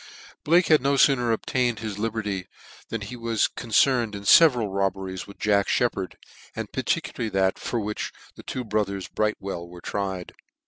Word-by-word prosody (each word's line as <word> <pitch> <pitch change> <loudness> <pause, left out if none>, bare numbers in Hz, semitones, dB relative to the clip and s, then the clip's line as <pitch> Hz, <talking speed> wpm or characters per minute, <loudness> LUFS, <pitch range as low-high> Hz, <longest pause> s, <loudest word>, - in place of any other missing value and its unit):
Blake 170 +3 +4
had 155 -3 +5
no 140 +2 +2
fooner 130 -3 +4
obtained 120 +1 0
his 105 -1 -5
liberty 105 -4 -2 0.4
than 115 - -3
he 105 +5 -6
was 115 -2 +1
concerned 120 -1 +1
in 100 - -7
feveral 120 -5 +6
robberies 95 -1 -2
with 100 - -12
Jack 100 -1 +2
Shcppard, 95 -7 0 0.4
and - - -5
particularly 115 -3 -1
that 95 -1 +1
for 120 - -2
which 105 0 -3 0.2
the - - -12
two 130 - -4
brothers, 105 -3 -2
Brightwell, 100 -5 -2
were 90 0 -11
tried. 95 -1 -4
105 Hz, 155 wpm, -25 LUFS, 100-120 Hz, 0.4 s, feveral